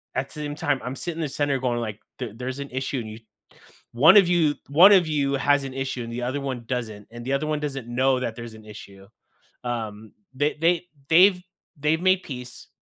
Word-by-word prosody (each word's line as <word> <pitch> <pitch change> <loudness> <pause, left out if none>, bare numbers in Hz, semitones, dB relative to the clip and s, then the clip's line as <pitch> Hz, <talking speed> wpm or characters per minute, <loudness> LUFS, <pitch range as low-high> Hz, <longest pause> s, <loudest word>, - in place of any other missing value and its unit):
at 135 +2 -2
the - - -12
same 145 -1 -5
time, 145 -4 -1
I'm 125 +1 -4
sitting 165 +4 -5
in - - -1
the 150 - -2
center 140 -1 0
going 120 -2 -1
like, 110 -2 -5 0.2
there 120 -5 -5
there's 130 +3 -5
an 140 0 -6
issue 130 +1 -2
and 110 -2 -6
you 110 - -10 0.7
one 155 - +7
of 195 -4 +7
you 165 -4 +3
one 175 +8 +8
of 185 -4 +5
you 140 -2 0
has 140 +1 +2
an 135 -1 -6
issue 135 -2 -3
and 115 - -7
the 120 +1 -4
other 130 +4 -2
one 130 -3 -4
doesn't, 110 -4 -4
and 120 +1 -9
the 135 - -1
other 145 +3 -1
one 155 -1 -1
doesn't 135 -5 -4
know 130 +2 +2
that 115 -2 -3
there's 115 -1 -8
an 110 - -14
issue, 100 -2 -12 0.6
um, 110 -3 -5 0.2
they 145 +3 0
they 170 +1 +3 0.3
they've 180 +3 +6 0.4
they've 155 +3 +1
made 185 0 +3
peace. 125 -3 -9
135 Hz, 225 wpm, -24 LUFS, 120-150 Hz, 0.7 s, one